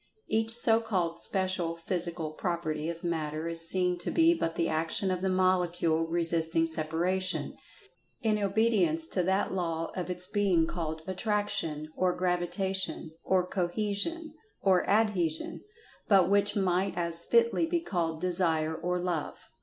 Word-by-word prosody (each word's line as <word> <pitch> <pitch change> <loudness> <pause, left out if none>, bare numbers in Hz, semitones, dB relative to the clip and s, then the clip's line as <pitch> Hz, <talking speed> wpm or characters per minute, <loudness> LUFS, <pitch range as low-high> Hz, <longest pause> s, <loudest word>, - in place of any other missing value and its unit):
Each 225 0 +1
so 230 -1 +6
called 180 -7 -1
Special 185 -3 -1
Physical 170 -2 -2
Property 160 -2 -3
of 170 0 -6
Matter 160 -2 -2
is 165 0 +3
seen 180 -1 +1
to 175 - -3
be 330 0 +4
but 165 - -2
the 165 -1 0
action 165 +4 0
of 180 -1 -2
the 190 - 0
Molecule 175 -3 +1
resisting 165 -1 +1
separation, 170 +4 -1 0.7
in 215 -2 +1
obedience 200 -6 +2
to 180 - -1
that 190 +3 0
law 165 -3 -2
of 180 -1 -4
its 180 0 -2
being 190 -5 +2
called 160 -1 -4
"Attraction," 185 -6 -1
or 180 -1 0
"Gravi[Pg 180 -1 0
146]tation," 190 -4 -2
or 185 -1 +2
"Cohesion," 210 - -2 0.3
or 190 -2 +2
"Adhesion"—but 200 - 0
which 205 0 +2
might 190 -1 0
as 170 -1 0
fitly 235 - +2
be 345 +1 0
called 170 - -2
"Desire," 165 -3 0
or 180 +2 -2
"Love." 175 -4 -4
180 Hz, 140 wpm, -29 LUFS, 165-195 Hz, 0.7 s, so